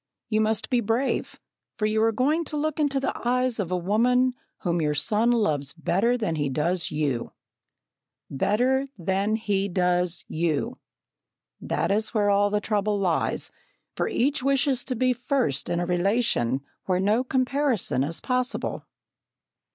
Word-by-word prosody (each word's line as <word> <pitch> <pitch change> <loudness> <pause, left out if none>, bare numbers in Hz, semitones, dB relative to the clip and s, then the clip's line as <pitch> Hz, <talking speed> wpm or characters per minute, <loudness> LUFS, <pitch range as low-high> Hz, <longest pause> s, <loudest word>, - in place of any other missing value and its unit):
You 215 -1 +2
must 220 +2 0
be 250 - +3
brave, 235 +4 -1 0.4
for 215 - 0
you 215 +1 +1
are 225 0 +4
going 290 +9 +1
to 300 - -3
look 310 +1 -1
into 285 -2 +1
the 270 - -2
eyes 250 -1 +1
of 190 -5 -1
a 180 - 0
woman 245 +7 +2 0.3
whom 170 -2 0
your 150 -1 0
son 210 +10 +1
loves 155 - +1
better 195 +9 +1
than 170 -9 -2
he 145 -2 0
does 165 +6 -1
you!" 145 -6 -2 0.9
"Better 250 - +1
than 195 +4 0
he 200 -3 -1
does 180 -1 0
you!" 165 - -1 0.9
That - - -1
is 215 +3 +1
where 205 -1 +3
all 205 +1 +3
the 210 0 +1
trouble 210 0 0
lies, 180 -5 0 0.4
for - - 0
each 285 - +1
wishes 270 -1 +2
to 255 - -2
be 255 +2 +2
first 245 - -1
in 175 0 0
a 175 - 0
relation 175 - +1 0.2
where 180 -1 +1
no 210 +6 +2
comparison 260 - 0
is 165 +4 -2
possible. 255 0 -2
215 Hz, 155 wpm, -25 LUFS, 175-250 Hz, 0.9 s, are